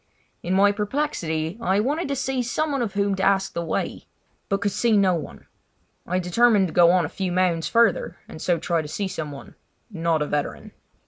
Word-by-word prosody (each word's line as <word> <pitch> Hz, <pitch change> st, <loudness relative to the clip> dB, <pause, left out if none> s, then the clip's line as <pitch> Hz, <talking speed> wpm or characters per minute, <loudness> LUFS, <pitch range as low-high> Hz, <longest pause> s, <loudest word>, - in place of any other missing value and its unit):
In 180 Hz, +2 st, -1 dB
my 200 Hz, +1 st, +5 dB
perplexity 205 Hz, -, -2 dB
I 190 Hz, -1 st, +2 dB
wanted 290 Hz, +10 st, -1 dB
to 280 Hz, -, -2 dB
see 265 Hz, -1 st, -1 dB
someone 275 Hz, +3 st, -1 dB
of 215 Hz, -4 st, -3 dB
whom 200 Hz, 0 st, +1 dB
to -, -, -2 dB
ask 195 Hz, 0 st, +2 dB
the 170 Hz, -, -2 dB
way, 160 Hz, -, -3 dB, 0.4 s
but 195 Hz, -1 st, +1 dB
could 205 Hz, 0 st, 0 dB
see 225 Hz, +1 st, +2 dB
no 190 Hz, -2 st, +4 dB
one. 165 Hz, -, -6 dB, 0.6 s
I 180 Hz, -, 0 dB
determined 195 Hz, +2 st, +3 dB
to -, -, -9 dB
go 175 Hz, -1 st, +6 dB
on 180 Hz, -1 st, +3 dB
a -, -, -2 dB
few 185 Hz, +3 st, -3 dB
mounds 175 Hz, -2 st, +1 dB
further 230 Hz, -4 st, +2 dB
and 155 Hz, -, -10 dB
so 175 Hz, -2 st, +1 dB
try 165 Hz, 0 st, 0 dB
to 150 Hz, -, -7 dB
see 195 Hz, +6 st, -3 dB
someone—not 165 Hz, +1 st, -4 dB
a -, -, -2 dB
veteran. 145 Hz, 0 st, -3 dB
190 Hz, 195 wpm, -24 LUFS, 170-220 Hz, 0.6 s, go